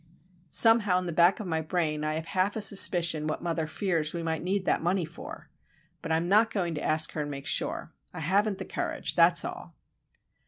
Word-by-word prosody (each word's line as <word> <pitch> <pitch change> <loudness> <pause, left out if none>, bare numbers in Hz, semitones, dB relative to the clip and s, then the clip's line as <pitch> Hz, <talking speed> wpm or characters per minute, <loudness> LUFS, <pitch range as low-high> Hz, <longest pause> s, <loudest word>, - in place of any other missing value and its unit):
Somehow, 220 -1 +4
in 185 - -3
the 170 - -4
back 175 +3 +3
of 215 - -6
my 160 -3 -2
brain 155 -2 -2
I 155 0 -2
have 160 0 -5
half 190 +3 -1
a 220 - -3
suspicion 170 -6 +3
what 155 - -4
mother 165 -2 -2
fears 165 -3 -2
we 170 - -4
may 160 -1 -2
need 190 +2 -2
that - - 0
money 175 +1 0
for. 155 - -11 0.5
But 165 - -6
I 160 - +2
am 170 +1 -3
not 215 +4 +4
going 175 -5 -3
to 150 - -5
ask 155 +1 +1
her 155 - -4
and 145 - -5
make 140 -1 -7
sure. - - -2 0.2
I - - -8
haven't 195 +5 0
the - - -7
courage, - - -3
that's - - +4
all. - - -8
170 Hz, 220 wpm, -27 LUFS, 160-190 Hz, 0.5 s, Somehow